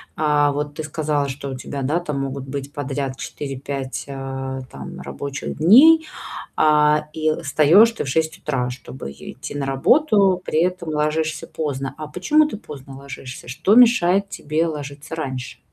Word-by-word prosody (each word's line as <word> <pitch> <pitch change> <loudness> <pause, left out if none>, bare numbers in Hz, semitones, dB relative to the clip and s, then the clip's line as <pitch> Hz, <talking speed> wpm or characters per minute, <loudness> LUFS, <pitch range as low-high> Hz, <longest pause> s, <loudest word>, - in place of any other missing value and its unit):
а 150 -1 +3
вот 145 +1 -3
ты 155 - -4
сказала, 150 -1 -1
что 140 +1 -5
у 130 - -5
тебя, 140 +1 -6
да, 145 +6 +1
там 150 -5 -3
могут 135 0 -4
быть 140 +1 -5
подряд 135 -1 -3
4-5, 135 +2 -5
а, 135 -1 -5
там 65 -1 -8
рабочих 140 0 -5
дней, 305 - +7 0.5
а 150 0 +4
и 155 0 +1
встаешь 160 +9 +6
ты 230 - -4
в - - -6
6 160 +4 0
утра, 130 -7 -2
чтобы 125 - -8
е 70 - -10
идти - - -8
на 140 - -2
работу. 195 - +3
При 155 - +1
этом 180 -2 -1
ложишься 155 +1 -1
поздно. 140 -4 -4
А 155 -1 -6
почему 300 - +3
ты 210 - -6
поздно 140 - -10
ложишься? 135 -2 -9
Что 160 - +2
мешает 200 -5 +5
тебе 155 0 -1
ложиться 145 0 -6
раньше? 130 -5 -5
150 Hz, 165 wpm, -21 LUFS, 135-160 Hz, 0.5 s, дней